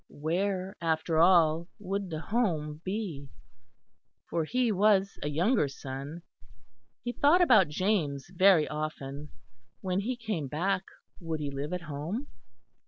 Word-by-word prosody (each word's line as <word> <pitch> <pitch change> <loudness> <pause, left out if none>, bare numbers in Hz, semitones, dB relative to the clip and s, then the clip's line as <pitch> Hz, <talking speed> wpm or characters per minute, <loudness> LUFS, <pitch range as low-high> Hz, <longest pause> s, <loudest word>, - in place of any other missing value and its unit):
Where 185 +5 -2
after 160 0 +1
all 170 -1 +5
would 200 -2 -3
the 160 -2 -4
home 160 -9 -1
be? 185 -9 -4 1.0
For 165 -2 0
he 245 +5 +1
was 200 -1 +3
a - - -2
younger 175 - +2
son. 140 +4 -7 0.8
He 240 - -2
thought 290 +7 +4
about 230 - +6
James 150 -4 0
very 185 -4 +5
often. 150 -1 -5 0.5
When 185 0 -1
he 240 +6 -2
came 215 - -3
back 185 +7 -1 0.3
would 165 -2 -4
he 145 -2 -3
live 140 +2 -4
at 180 -1 -2
home? 160 - -4
170 Hz, 130 wpm, -29 LUFS, 150-200 Hz, 1.0 s, about